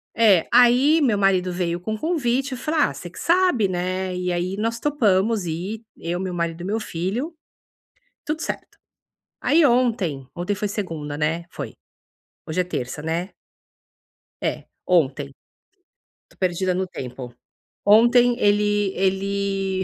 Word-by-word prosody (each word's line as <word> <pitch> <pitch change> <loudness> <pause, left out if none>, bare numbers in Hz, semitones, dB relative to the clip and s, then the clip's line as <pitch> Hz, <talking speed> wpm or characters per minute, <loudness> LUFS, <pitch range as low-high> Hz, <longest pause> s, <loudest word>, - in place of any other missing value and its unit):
É. 205 -7 +5
Aí 250 +6 +6
meu 230 -7 +3
marido 185 -2 +2
veio 175 -1 -1
com 215 +5 -4
o - - -9
convite 275 -5 0
e - - -2
eu - - -8
falei: 310 +3 0
"Ah, - - +2
você 175 - -8
que - - -16
sabe, 345 - +3
né". 185 +1 -2
E 180 0 -2
aí 180 +3 -2
nós 230 +2 -1
topamos 220 -8 +2
ir. 185 +7 -4 0.2
Eu, 175 +2 -3
meu 185 -1 -3
marido 170 -1 -2
e - - -5
meu 215 +3 -1
filho. 215 - -3 0.9
Tudo 305 +1 -2
certo. - - -5 0.6
Aí, 315 +2 +4
ontem 225 - +1
ontem 180 +4 -1
foi 210 - -2
segunda, 160 -8 -4
né? 165 +3 -1
Foi. - - -6 0.8
Hoje 160 +3 0
é - - 0
terça, 150 -5 -4
né? 170 +4 -2 1.1
É. - - -2 0.2
Ontem. 145 -5 +1 0.9
Estou - - -26
perdida 185 0 0
no 185 +1 -1
tempo. 125 -5 -7 0.5
Ontem 240 +3 +6
ele 205 -1 +2
ele 195 0 0
195 Hz, 150 wpm, -23 LUFS, 175-230 Hz, 1.1 s, Aí